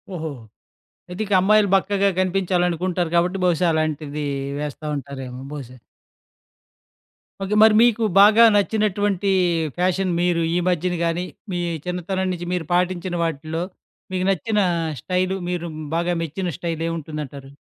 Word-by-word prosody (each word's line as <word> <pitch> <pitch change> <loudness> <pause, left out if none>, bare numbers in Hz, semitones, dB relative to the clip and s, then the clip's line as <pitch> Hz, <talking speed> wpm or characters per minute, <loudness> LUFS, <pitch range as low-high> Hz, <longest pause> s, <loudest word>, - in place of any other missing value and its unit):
ఓహో! 160 -2 -4 0.8
అయితే 180 +3 -5
ఇక 205 - -2
అమ్మాయిలు 210 +1 +4
బక్కగా 200 +1 +2
కనిపించాలనుకుంటారు 180 -2 0
కాబట్టి 180 +3 +2
బహుశా 175 0 +2
అలాంటిది 150 -1 -2 0.3
వేస్తా 150 +1 -5
ఉంటారేమో 135 -2 -7
బహుశా. 130 -4 -8 1.6
ఓకే. 205 +2 -1
మరి 220 -1 +7
మీకు 235 -1 +4 0.2
బాగా 215 +3 +8
నచ్చినటువంటి 205 -2 +1 0.5
ఫ్యాషన్ 185 +1 +1
మీరు 175 -1 +1
ఈ - - +3
మధ్యన 180 0 0
గానీ, 170 +2 -1 0.3
మీ 175 - -2 0.3
చిన్నతనం 185 +1 -2
నుంచి 175 -1 -4
మీరు 175 -2 -2
పాటించిన 180 0 0
వాటిలో 160 +1 -3 0.5
మీకు 185 0 -1
నచ్చిన 210 +3 0 0.4
స్టైలు 185 +1 0
మీరు 175 -1 -3 0.3
బాగా 170 +1 0
మెచ్చిన 175 +3 -3
స్టైల్ 165 -2 -4
ఏముంటుంది 160 -2 -5
అంటారు? 135 0 -11
180 Hz, 125 wpm, -22 LUFS, 160-190 Hz, 1.6 s, బాగా